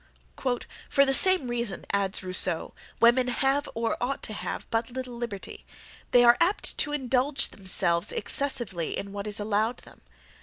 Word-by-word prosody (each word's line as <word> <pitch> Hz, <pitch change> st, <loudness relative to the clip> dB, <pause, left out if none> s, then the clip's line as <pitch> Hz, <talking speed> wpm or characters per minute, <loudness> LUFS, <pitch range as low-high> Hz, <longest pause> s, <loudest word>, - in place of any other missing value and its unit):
"For 280 Hz, -1 st, +4 dB
the 270 Hz, -, +2 dB
same 370 Hz, -2 st, +6 dB
reason," 235 Hz, -4 st, -4 dB
adds 200 Hz, 0 st, -1 dB
Rousseau, 185 Hz, -2 st, +1 dB, 0.3 s
"women 240 Hz, +2 st, +4 dB
have 270 Hz, +3 st, 0 dB
or 230 Hz, 0 st, -1 dB
ought 260 Hz, +3 st, -2 dB
to 215 Hz, -, -4 dB
have, -, -, -6 dB
but 225 Hz, +1 st, -1 dB
little 255 Hz, 0 st, -7 dB
liberty; 235 Hz, -5 st, -7 dB, 0.5 s
they 245 Hz, -, +5 dB
are 240 Hz, 0 st, +6 dB
apt 365 Hz, +5 st, +1 dB
to 295 Hz, -, +1 dB
indulge 270 Hz, 0 st, 0 dB
themselves 185 Hz, -1 st, +2 dB
excessively 235 Hz, -, -2 dB
in 200 Hz, -, -6 dB
what 200 Hz, +1 st, -5 dB
is 210 Hz, 0 st, -3 dB
allowed 215 Hz, +3 st, -1 dB
them. -, -, -17 dB
235 Hz, 155 wpm, -26 LUFS, 200-265 Hz, 0.5 s, same